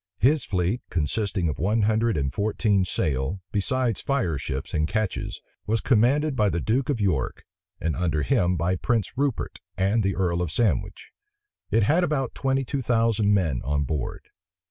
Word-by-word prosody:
His 140 +4 +3
fleet, 95 +5 0
consisting 90 +3 -1
of 75 - -3
one 105 +6 +1
hundred 110 0 +2
and 70 -1 -1
fourteen 100 - +1
sail, 70 +1 -1
besides 120 +2 0
fireships 80 - -2
and 75 0 +1
ketches, 110 -1 -2 0.3
was 110 +2 +1
commanded 135 +6 +2
by 105 -4 +3
the 85 -1 -1
duke 120 - 0
of 135 -5 0
York, 90 -11 -1 0.3
and 80 -1 -1
under 80 -4 0
him 90 +7 +2
by 90 +3 0
Prince 115 +2 -1
Rupert 140 -2 -1 0.2
and 100 +4 +2
the 100 -2 0
earl 90 -2 0
of 85 -3 -2
Sandwich. 115 +3 -1 0.6
It 115 0 +3
had 160 - +3
about 140 -7 -1
twenty 135 0 0
two 135 +3 -2
thousand 115 -4 +2
men 80 -11 0
on 70 +2 0
board. 70 -1 -4
105 Hz, 165 wpm, -25 LUFS, 85-120 Hz, 0.6 s, His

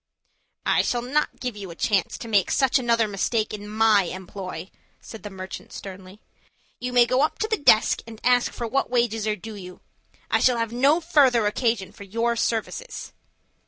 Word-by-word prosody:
"I - - +3
shall 240 -1 -1
not 290 +5 -1
give 250 -3 -4
you 200 -3 -8
a 170 - -9
chance 195 +1 0
to 230 - -8
make 205 -4 +2
such 265 -1 +3
another 235 -2 +2
mistake 215 +2 -1
in 210 0 -7
my 215 -2 +4
employ," 185 +1 -7 0.3
said 225 - -11
the 205 - -7
merchant 190 -1 -8
sternly. 190 +1 -10 0.6
"You 250 +1 -3
may 245 -1 +6
go 255 +2 +1
up 305 - +1
to 435 - -1
the 440 - +1
desk 260 - +4
and 225 -1 -10
ask 245 0 +3
for 235 - -4
what 270 +4 0
wages 235 -3 0
are 215 - +1
due 220 +3 -9
you. 180 -3 -10 0.5
I - - +4
shall 250 -2 +3
have 230 -1 -1
no 280 +7 +3
further 270 -9 +4
occasion 210 -2 0
for - - -12
your 230 +4 -1
services." 235 - -3
225 Hz, 190 wpm, -24 LUFS, 205-250 Hz, 0.6 s, may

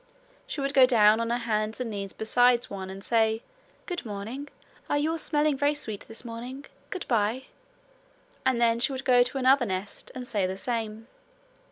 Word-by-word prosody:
She 285 - -4
would 275 0 -1
go 265 -2 +7
down 215 -3 +5
on 230 0 -1
her 240 - +1
hands 220 -1 -1
and 245 -3 -3
knees 200 -2 -4
beside 245 +2 +3
one 190 -1 -7
and 195 +1 -8
say: 225 -1 +2 0.4
'Good 355 -2 -4
morning! 225 +6 -6 0.4
Are - - +2
you 300 +2 +1
all 330 - -2
smelling 300 -1 +2
very 285 +2 +1
sweet 220 -8 -4
this 225 +2 -8
morning? 245 +4 -7 0.2
Good 370 -3 -5
bye!' 230 +2 +1 1.0
and 260 -2 +2
then 230 -1 +3
she 240 - +2
would 265 0 -5
go 250 -2 +6
to 245 +2 +1
another 260 -1 +4
nest, 190 +1 -4
and 250 -1 -6
say 205 -6 0
the 190 +1 -4
same. 225 0 -3
235 Hz, 190 wpm, -27 LUFS, 215-265 Hz, 1.0 s, go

